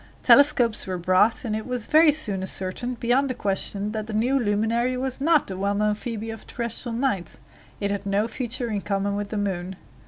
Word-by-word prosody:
Telescopes 270 -8 +4
were 185 -1 -2
brought, 185 +8 +2
and 215 -2 -1
it 220 +2 -5
was 250 -3 -2
very 310 0 +6
soon 215 -11 +1
ascertained, 195 +6 -3
beyond 255 +4 +1
a 255 - -2
question, 200 0 -1
that 215 -1 -4
the 220 - -5
new 250 +5 +2
luminary 230 +3 0
was 260 0 -3
not 315 0 +3
the 190 - -6
well 200 +2 -1
known 210 +1 +1
Phoebe 225 0 -5
of 225 - -10
terrestrial 235 0 -4
nights; 235 -9 -2 0.4
it 200 -1 -1
had 200 0 -4
no 200 +3 +1
feature 240 0 -4
in 205 -2 -2
common 200 0 -1
with 205 0 -4
the 215 - -4
moon. 190 -2 -3
220 Hz, 200 wpm, -24 LUFS, 200-250 Hz, 0.4 s, very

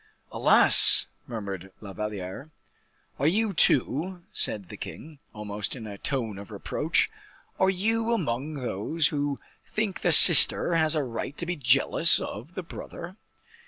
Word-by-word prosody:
"Alas!" - - +4 0.2
murmured 100 -5 -8
La 100 -2 -12
Valliere. 105 +5 -8 0.7
"Are 140 - 0
you, 210 +4 -1
too," 170 +4 -1
said 100 -4 -3
the - - -10
king, 150 -2 -12
almost 105 0 -7
in 115 -4 -10
a 100 -2 -10
tone 115 -8 -5
of 100 - -13
reproach, - - -3 0.5
"are 190 - +1
you 225 +5 -2
among 150 - -4
those 135 - -3
who 145 -2 -4 0.3
think 215 -3 -5
the - - 0
sister - - +8
has 160 -1 0
a 150 - -2
right 130 +3 -8
to 170 - -5
be 175 +1 -5
jealous 140 +4 +2
of 130 - -10
the 185 - -7
brother?" 170 +2 -11
140 Hz, 145 wpm, -24 LUFS, 105-170 Hz, 0.7 s, sister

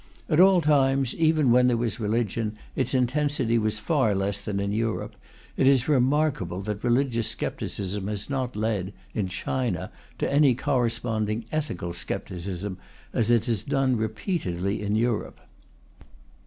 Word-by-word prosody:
At 155 -1 +2
all 190 -1 +7
times, 135 -4 +2
even 155 -5 +3
when 125 +1 +5
there 120 -2 +2
was 115 0 -2
religion, 110 0 -1 0.2
its 130 - 0
intensity 130 -2 +1
was 110 0 0
far 115 -3 +1
less 100 +1 -1
than 100 -1 -2
in 100 0 -1
Europe. 115 +1 -2 0.4
It 135 - +3
is 135 -2 +4
remarkable 135 - +1
that 105 0 -4
religious 120 -2 +1
scepticism 100 -3 -3
has 105 0 -3
not 130 -4 -2
led, 105 -3 -1 0.2
in 100 -3 -1
China, 90 +2 -2 0.3
to - - -1
any 140 -3 +5
corresponding 115 -4 -1
ethical 95 - -3
scepticism, 90 +2 -5 0.3
as 115 - +1
it 115 -2 +3
has 115 -6 0
done 135 -2 +1
repeatedly 105 - -2
in 105 0 -1
Europe. 115 0 -1
115 Hz, 140 wpm, -26 LUFS, 105-135 Hz, 0.4 s, all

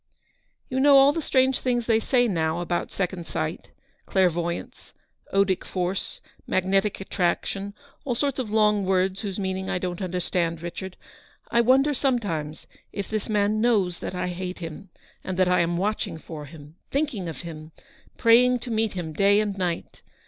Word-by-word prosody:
"You 260 - -2
know 280 0 +7
all 275 +1 +7
the 330 - -2
strange 260 -2 +2
things 245 -2 0
they 225 -1 +3
say 245 +2 +2
now 165 -4 0
ahout 175 0 -1
second 180 -3 -3
sight, 80 - -4 0.4
clairvoyance, 175 -2 -1 0.4
odic 195 -1 +2
force 185 +1 -3 0.3
magnetic 195 +2 +1
attraction 195 +2 -2
— - - -33
all 255 -5 -1
sorts 275 +1 -1
of 245 -5 -2
long 210 -1 +3
words 190 +1 +1
whose 200 -4 -4
meaning 190 -1 -2
I - - 0
don't 180 0 -4
understand, 175 -2 -1
Richard 185 +2 -6 0.3
— - - -29
I 235 - +4
wonder 265 +5 +4
sometimes 205 - -1 0.3
if 200 -2 -5
this 215 -1 -3
man 210 0 +2
knows 200 -7 +2
that - - -5
I 180 0 -2
hate 180 +1 -5
him, 170 +3 -8 0.3
and 185 -1 -4
that 185 -1 +4
I 180 0 +3
am 170 0 +1
watching 200 -2 -1
for 155 -2 -8
him, 150 +1 -13
thinking 270 - -1
of 160 - -7
him, 160 -2 -9 0.5
praying 250 +2 +5
to 245 - -6
meet 220 -1 0
him 170 -4 -4
day 200 +5 +4
and 210 -2 -1
night. 180 -3 -3
190 Hz, 170 wpm, -25 LUFS, 175-225 Hz, 0.5 s, know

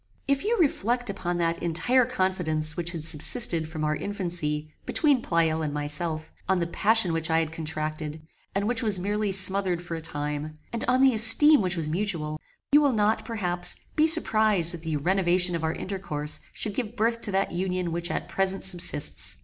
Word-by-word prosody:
If 275 +2 0
you 460 +3 -1
reflect 245 - -1
upon 175 -3 -4
that 170 -1 -2
entire 175 +10 +2
confidence 180 -9 -2
which 175 0 -4
had 165 -3 -6
subsisted 160 - +3
from 160 -1 -6
our 155 0 -1
infancy 160 -6 -4
between 285 -5 +1
Pleyel 165 -4 -1
and 150 - -3
myself; 155 +2 -5 0.2
on 190 - +2
the 170 - -1
passion 205 +1 +2
that 165 0 -1
I 160 - +1
had 160 -1 -1
contracted, 155 -1 -5 0.4
and 200 +1 -1
which 240 -1 -1
was 215 -5 +1
merely 205 +2 -2
smothered 190 -1 +2
for 175 -1 -9
a 165 - -5
time; 150 0 -5 0.2
and 230 - -2
on 255 +1 +2
the 265 -1 +4
esteem 235 +7 +8
which 180 -2 -2
was 160 -2 -2
mutual, 160 -3 -3 0.3
you 295 +1 +5
will 285 -3 +1
not, 215 0 0
perhaps, 180 -6 -3 0.2
be 310 0 +3
surprized 215 - +5
that 170 - -8
the 160 -2 -3
renovation 180 +2 +1
of 165 - -5
our 160 0 -1
intercourse 155 -6 -3
should 210 - -2
give 230 0 -5
birth 230 +1 -1
to 205 - -5
that 195 +1 -1
union 180 -1 -3
which 170 +1 -4
at - - -4
present 195 0 -1
subsists. 175 -6 +2
180 Hz, 190 wpm, -25 LUFS, 160-215 Hz, 0.4 s, esteem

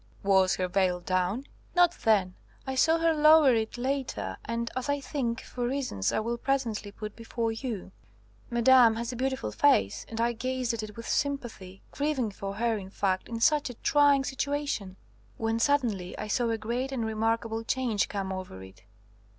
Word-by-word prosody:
"Was 190 -2 +4
her 185 - -1
veil 180 -1 +1
down?" 185 +8 -1 0.3
"Not 355 -1 +6
then. 200 -5 +3 0.3
I 265 - -3
saw 320 +5 +4
her 330 0 +2
lower 305 -3 +6
it 220 +1 -1
later, 255 - -2
and, 230 +1 -3
as 255 +2 -3
I 285 0 +1
think, 260 -5 -3
for 245 -1 -4
reasons 255 - -1
I - - 0
will 235 +2 -2
presently 235 -7 -1
put 210 0 -8
before 230 0 -3
you. 225 -5 -5 0.6
Madame 240 -1 +5
has 235 +2 -3
a - - -6
beautiful 265 +2 -2
face, 280 - +2
and 225 - -6
I 235 +1 +2
gazed 255 0 -2
at 230 - -3
it 215 0 -8
with 230 - -7
sympathy, 240 -10 -3
grieving 280 -6 -1
for 195 0 -6
her, 225 0 0
in 190 -1 -9
fact, 190 -2 -1
in 230 -1 -4
such 300 +3 +3
a 245 - -8
trying 285 +1 +4
situation; 275 -8 -2 0.4
when 225 0 -1
suddenly 230 -9 0
I - - -5
saw 235 +3 0
a 225 - 0
great 240 +5 -3
and 245 -4 -2
remarkable 225 +1 -1
change 235 -3 0
come 195 -2 -3
over 185 - -7
it." 95 0 -14
230 Hz, 180 wpm, -28 LUFS, 205-265 Hz, 0.6 s, Not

